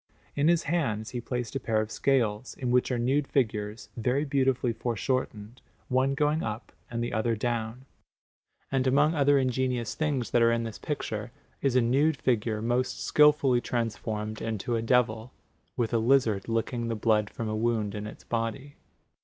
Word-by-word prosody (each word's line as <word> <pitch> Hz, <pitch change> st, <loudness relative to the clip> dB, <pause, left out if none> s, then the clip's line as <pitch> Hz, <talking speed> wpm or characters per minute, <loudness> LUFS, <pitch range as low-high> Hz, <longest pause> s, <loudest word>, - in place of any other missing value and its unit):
In 145 Hz, +1 st, +2 dB
his 170 Hz, -1 st, +3 dB
hands 120 Hz, -10 st, -1 dB
he 120 Hz, -, -4 dB
placed 125 Hz, +1 st, -4 dB
a -, -, 0 dB
pair 115 Hz, -3 st, 0 dB
of 110 Hz, 0 st, -3 dB
scales, 120 Hz, -4 st, 0 dB
in 125 Hz, -2 st, -2 dB
which 125 Hz, +1 st, +2 dB
are 125 Hz, -, 0 dB
nude 135 Hz, +4 st, +1 dB
figures, 110 Hz, -4 st, -1 dB
very 125 Hz, +5 st, 0 dB
beautifully 130 Hz, -3 st, +1 dB
foreshortened, 120 Hz, -1 st, -3 dB, 0.3 s
one 130 Hz, +2 st, +2 dB
going 150 Hz, +2 st, +1 dB
up 110 Hz, -1 st, -5 dB, 0.2 s
and 120 Hz, 0 st, -2 dB
the 120 Hz, -, -3 dB
other 115 Hz, +1 st, +1 dB
down; 115 Hz, +2 st, -3 dB, 0.9 s
and 135 Hz, -1 st, +1 dB
among 145 Hz, +4 st, +4 dB
other 145 Hz, -2 st, +4 dB
ingenious 125 Hz, -3 st, 0 dB
things 145 Hz, -6 st, -1 dB
that 120 Hz, -, +3 dB
are 115 Hz, 0 st, +5 dB
in 115 Hz, 0 st, 0 dB
this 115 Hz, -2 st, -6 dB
picture -, -, -4 dB, 0.3 s
is 135 Hz, -3 st, +1 dB
a 125 Hz, -, +5 dB
nude 140 Hz, +6 st, +2 dB
figure 110 Hz, -3 st, 0 dB
most 120 Hz, +2 st, -1 dB
skilfully 150 Hz, -4 st, +4 dB
transformed 110 Hz, -3 st, -3 dB
into 115 Hz, +1 st, -2 dB
a 115 Hz, -, 0 dB
devil, 115 Hz, 0 st, +1 dB, 0.4 s
with 120 Hz, -2 st, -1 dB
a 115 Hz, -, +3 dB
lizard 115 Hz, -4 st, +2 dB
licking 115 Hz, +1 st, -1 dB
the 115 Hz, -, -1 dB
blood 105 Hz, -1 st, +2 dB
from 115 Hz, -, -5 dB
a 110 Hz, -, -2 dB
wound 110 Hz, -2 st, 0 dB
in 105 Hz, 0 st, -5 dB
its -, -, -11 dB
body. 120 Hz, +5 st, -3 dB
120 Hz, 175 wpm, -28 LUFS, 110-135 Hz, 0.9 s, are